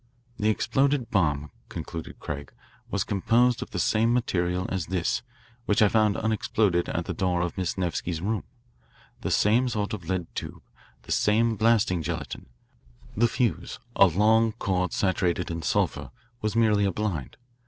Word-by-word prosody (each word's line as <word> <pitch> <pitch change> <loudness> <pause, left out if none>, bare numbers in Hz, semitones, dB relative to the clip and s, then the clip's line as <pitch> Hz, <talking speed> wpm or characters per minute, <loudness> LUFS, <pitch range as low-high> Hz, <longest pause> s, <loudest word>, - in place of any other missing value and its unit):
"The 105 0 +2
exploded 135 +3 +1
bomb," 75 - +1 0.2
concluded 80 -1 -7
Craig, 70 -2 -6 0.4
"was - - 0
composed 115 +5 +2
of - - -5
the - - -5
same 115 +2 +2
materials 90 -7 0
as 95 -4 -2
this, 90 -1 0 0.5
which 105 - +2
I 105 - +6
found 110 -1 +3
unexploded 105 -4 +1
at 85 - -2
the - - -3
door 90 -3 0
of 90 -1 -2
Miss 95 -1 -2
Nevsky's 90 -2 -2
room 105 +5 -1 0.8
the - - -3
same 120 +5 +3
sort 105 -1 -2
of 90 -6 -6
lead 95 -2 -1
tube, - - -6 0.4
the - - -9
same 115 +2 +3
blasting 110 -5 +2
gelatine. 75 - -5 0.7
The 120 +3 +4
fuse, 115 - -1 0.2
a 100 - +7
long 110 +5 +3
cord 90 -5 -1
saturated 90 -3 0
in 85 0 -4
sulphur, - - 0 0.3
was 110 0 -1
merely 105 -3 +3
a 100 - +1
blind. 90 - -3
100 Hz, 155 wpm, -26 LUFS, 90-110 Hz, 0.8 s, a